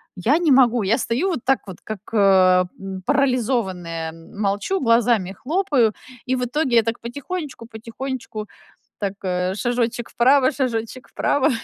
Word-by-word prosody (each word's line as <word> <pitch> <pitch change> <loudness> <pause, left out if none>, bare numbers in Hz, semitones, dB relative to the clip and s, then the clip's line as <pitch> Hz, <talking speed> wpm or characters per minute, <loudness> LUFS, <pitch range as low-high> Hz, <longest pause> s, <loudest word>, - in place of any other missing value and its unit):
Я 225 - +2
не 340 -4 +2
могу. 245 -3 +5
Я 220 +6 +2
стою 250 +14 0
вот 340 - -1
так 270 0 +2
вот, 190 -3 -9
как, 215 -3 -6
э, 185 -3 +5
м, 195 -1 -6
парализованная, 215 - 0
молчу, 200 - -2
глазами 230 - +2
хлопаю, 270 - +1 0.4
и 260 - +1
в 250 -1 -1
итоге 260 0 0
я 230 - +6
так 230 +1 -3
потихонечку-потихонечку, 240 -4 -6 0.5
так, 200 -2 -2
э, 180 0 -1
шажочек 240 +1 -1
вправо, 260 +2 +4
шажочек 250 -1 -3
вправо 285 +1 +1
235 Hz, 140 wpm, -22 LUFS, 200-260 Hz, 0.5 s, я